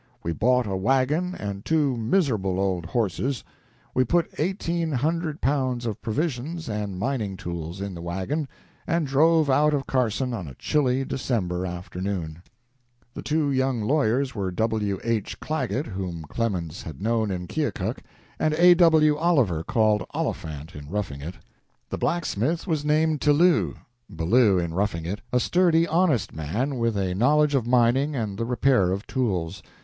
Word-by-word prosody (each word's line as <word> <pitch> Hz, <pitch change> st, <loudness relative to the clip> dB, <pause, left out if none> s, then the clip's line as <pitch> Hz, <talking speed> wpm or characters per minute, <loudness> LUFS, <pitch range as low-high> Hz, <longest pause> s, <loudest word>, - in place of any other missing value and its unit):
We 85 Hz, -, -1 dB
bought 125 Hz, +7 st, +2 dB
a 100 Hz, -2 st, -2 dB
wagon 135 Hz, -, +1 dB
and 100 Hz, -1 st, -5 dB
two 150 Hz, -5 st, +1 dB
miserable 110 Hz, -, +1 dB
old 95 Hz, -4 st, -1 dB
horses. 120 Hz, -, -1 dB, 0.5 s
We 130 Hz, -, +3 dB
put 170 Hz, +7 st, +1 dB
eighteen 170 Hz, -1 st, -1 dB
hundred 155 Hz, +3 st, -1 dB
pounds 130 Hz, -3 st, 0 dB
of 110 Hz, -4 st, -4 dB
provisions 150 Hz, +6 st, -2 dB
and 105 Hz, -3 st, -3 dB
mining 105 Hz, -3 st, -2 dB
tools 85 Hz, 0 st, -5 dB
in 100 Hz, -1 st, -4 dB
the 85 Hz, -, -7 dB
wagon 95 Hz, -, -2 dB, 0.4 s
and 165 Hz, -1 st, +1 dB
drove 155 Hz, +3 st, +4 dB
out 150 Hz, +2 st, +3 dB
of 135 Hz, -, -2 dB
Carson 125 Hz, 0 st, 0 dB
on 95 Hz, -8 st, -4 dB
a 65 Hz, -, -9 dB
chilly 135 Hz, -, +1 dB
December 95 Hz, -10 st, -2 dB
afternoon.." 90 Hz, -2 st, -5 dB, 0.7 s
The -, -, -6 dB
two 150 Hz, -1 st, 0 dB
young 130 Hz, -2 st, +1 dB
lawyers 135 Hz, 0 st, +1 dB
were 100 Hz, -3 st, -2 dB
W. 105 Hz, 0 st, -1 dB
H. 115 Hz, -3 st, -2 dB
Clagget, 135 Hz, -3 st, -2 dB
whom 95 Hz, -5 st, -5 dB
Clemens 90 Hz, -2 st, -3 dB
had 80 Hz, -5 st, -8 dB
known 110 Hz, 0 st, 0 dB
in 90 Hz, -2 st, -3 dB
Keokuk, 115 Hz, -, -2 dB, 0.4 s
and 155 Hz, 0 st, +1 dB
A. 175 Hz, +2 st, +7 dB
W. 160 Hz, -4 st, +5 dB
Oliver, 135 Hz, -, +2 dB
called 110 Hz, +1 st, +2 dB
Oliphant 80 Hz, +2 st, -4 dB
in 75 Hz, 0 st, -9 dB
"Roughing 95 Hz, -8 st, -3 dB
It." 85 Hz, +5 st, -6 dB, 0.6 s
The -, -, -3 dB
blacksmith 165 Hz, -1 st, -1 dB
was 160 Hz, -6 st, -1 dB
named 155 Hz, 0 st, +2 dB
Tillou 155 Hz, +4 st, +3 dB, 0.3 s
(Ballou 100 Hz, +4 st, +3 dB
in 85 Hz, -2 st, -1 dB
"Roughing 90 Hz, -3 st, -1 dB
It"), 100 Hz, +5 st, -4 dB
a 125 Hz, -, +3 dB
sturdy, 170 Hz, +2 st, +3 dB
honest 160 Hz, -, +1 dB
man 115 Hz, -, -2 dB
with 115 Hz, -2 st, 0 dB
a 95 Hz, -2 st, 0 dB
knowledge 150 Hz, +8 st, +3 dB
of 125 Hz, -4 st, +1 dB
mining 125 Hz, +4 st, +3 dB
and 105 Hz, -4 st, -3 dB
the 115 Hz, -, 0 dB
repair 125 Hz, -5 st, +2 dB
of 100 Hz, +2 st, -3 dB
tools. 95 Hz, -8 st, -2 dB
120 Hz, 155 wpm, -25 LUFS, 95-150 Hz, 0.7 s, A